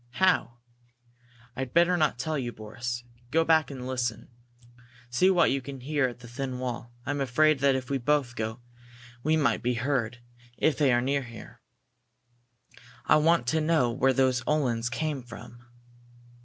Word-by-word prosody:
"How?" 180 -7 +2 1.0
"I'd 130 +1 -5
better 175 +1 +5
not 155 -6 +1
tell 155 +5 -2
you, 125 -4 -2
Boris. 120 +2 -5 0.3
Go 165 +3 +3
back 160 -1 +3
and 130 -3 -7
listen 125 -3 -3 0.8
see 180 +10 +4
what 180 -3 +4
you 135 0 0
can 135 0 -8
hear 145 0 +1
at 120 0 -9
the 120 - -11
thin 130 +1 -4
wall. 120 -2 -5
I'm 145 -1 -2
afraid 145 +3 +3
that 135 0 +3
if 130 0 -4
we 135 - 0
both 135 -2 0
go 110 +2 -4 0.6
we 155 +4 +2
might 135 -7 +1
be 125 +1 0
heard, 125 -1 -1 0.4
if 155 - +2
they 140 -2 +3
are 120 0 +3
near 135 0 -1
there. 115 - -12 1.4
I 155 - +5
want 155 -4 +3
to 160 +2 +1
know 155 -6 +2
where 135 +2 +2
those 130 -1 +2
Uhlans 120 -6 +1
come 150 +1 -2
from." 120 0 -12
130 Hz, 165 wpm, -27 LUFS, 120-150 Hz, 1.4 s, better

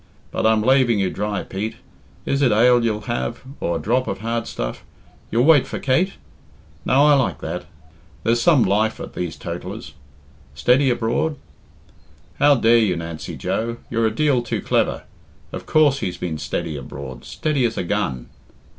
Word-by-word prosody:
But - - +1
I'm 110 -1 +3
laving 130 -2 +4
you 95 -2 0
dry, 105 0 -2
Pete. 105 +4 -4 0.5
Is 140 - 0
it 130 - +4
ale 120 +3 +5
you'll 110 -2 0
have, 120 +1 -3 0.2
or 85 - -1
a - - -5
drop 125 +4 0
of - - -4
hard 115 0 -2
stuff? - - -5 0.5
You'll 115 +2 +2
wait 155 -4 +5
for - - -4
Kate? 170 +9 +1 0.7
Now 140 +3 +4
I 150 - +6
like 120 - +1
that. - - -4 0.6
There's 115 +2 +2
some 145 -2 +5
life 105 +3 +1
at - - -7
these 90 -2 -4
totallers. - - -7 0.6
'Steady 125 - +3
abroad?' 120 +6 0 1.0
How 145 0 +6
dare 115 -1 +4
you, 105 -5 +2
Nancy 85 -2 -6
Joe? 115 +1 -2
You're 115 -1 +2
a - - 0
deal 135 +1 +2
too 120 - -3
clever. - - 0 0.5
Of - - -7
course 145 -3 +4
he's 90 - -3
been 80 -3 -4
steady 80 0 -3
abroad 65 -2 -8
steady 150 -4 -1
as 115 - -2
a - - -1
gun." 85 -10 -2
115 Hz, 170 wpm, -21 LUFS, 100-130 Hz, 1.0 s, I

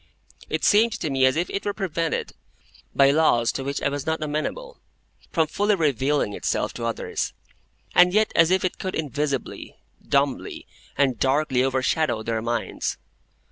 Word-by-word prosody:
It - - -2
seemed 220 +2 +4
to 160 -10 -3
me 135 -1 +4
as 130 - +1
if 175 +2 0
it 200 - -3
were 205 - -2
prevented, 165 -5 -2 0.6
by 140 0 +6
laws 130 -6 +3
to 135 - -4
which 140 +1 -3
I - - +2
was 145 -1 -4
not 160 0 -2
amenable, 315 - -4 0.5
from 160 -2 +2
fully 205 +6 +1
revealing 145 - +1
itself - - -1
to 115 - -5
others, 115 - -3 0.6
and 180 0 +6
yet 215 +2 +2
as 165 0 +5
if 185 0 +2
it 185 - -3
could 185 - -3
invisibly, 145 -3 -3 0.3
dumbly, 140 -1 -1 0.3
and 130 -5 +2
darkly 135 0 +2
overshadow 130 -2 0
their 115 0 -2
minds. 120 +1 -2
150 Hz, 160 wpm, -24 LUFS, 130-175 Hz, 0.6 s, by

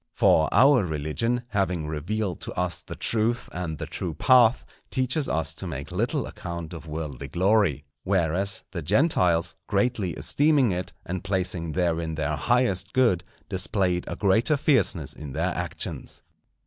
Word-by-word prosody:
For 80 - +4
our 130 +2 +5
religion, 85 +10 -1
having 90 -7 0
revealed 90 +6 -3
to - - -6
us - - -1
the - - -8
truth 115 +1 0
and 85 -3 -4
the - - -5
true 85 -4 -5
path, 125 -2 +5 0.2
teaches 130 +3 0
us 80 -1 0
to 90 +3 -6
make 70 -4 -6
little - - -1
account 85 -1 -7
of 85 -1 -9
worldly 75 -4 -5
glory; 90 -2 +2 0.2
whereas, 95 +2 0
the 85 - -4
Gentiles, 90 - +2
greatly 110 -8 0
esteeming 145 - +2
it, 90 0 -3
and 90 0 -4
placing 90 -4 -1
therein 85 -2 0
their 75 -1 -1
highest 105 -2 +1
good, 115 -9 +3 0.2
displayed 95 -2 0
a - - -4
greater 110 +9 +3
fierceness 115 - +2
in 75 -3 -8
their - - 0
actions. - - -4
90 Hz, 150 wpm, -26 LUFS, 80-115 Hz, 0.2 s, our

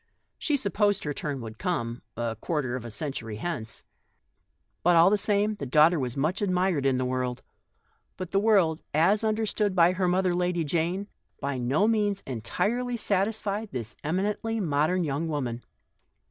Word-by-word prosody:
She 295 -2 +1
supposed 205 -3 +1
her 150 - -2
turn 140 -2 -4
would 110 -1 -8
come 120 -10 -2
— - - -51
a 115 -1 -2
quarter 130 +1 -2
of 125 -2 -5
a - - -5
century 115 -1 -4
hence. 115 -2 -5 1.0
But 175 0 +4
all 170 +3 +7
the 210 - +4
same, 205 +1 +2
the 200 -9 -6
daughter 155 +5 +5
was 125 -1 -3
much 155 +9 0
admired 180 -7 +1
in 130 -1 +2
"the 130 - 0
world;" 125 -1 -2 0.7
but 185 -1 -6
"the 195 - +3
world 195 -7 +3
" - - -47 0.2
as 210 +1 +1
understood 215 -2 0
by 170 -1 +6
her 185 0 0
mother, 180 0 +2
Lady 175 -1 0
Jane, 170 +6 -1 0.3
by 140 -2 -2
no 135 - +2
means 205 -3 +1
entirely 215 - -1
satisfied 210 +1 0
this 115 -5 -5
emi 190 +7 0
nently 225 0 -3
modern 165 +1 +1
young 150 +2 -1
woman. 130 -6 -3
170 Hz, 175 wpm, -27 LUFS, 135-200 Hz, 1.0 s, all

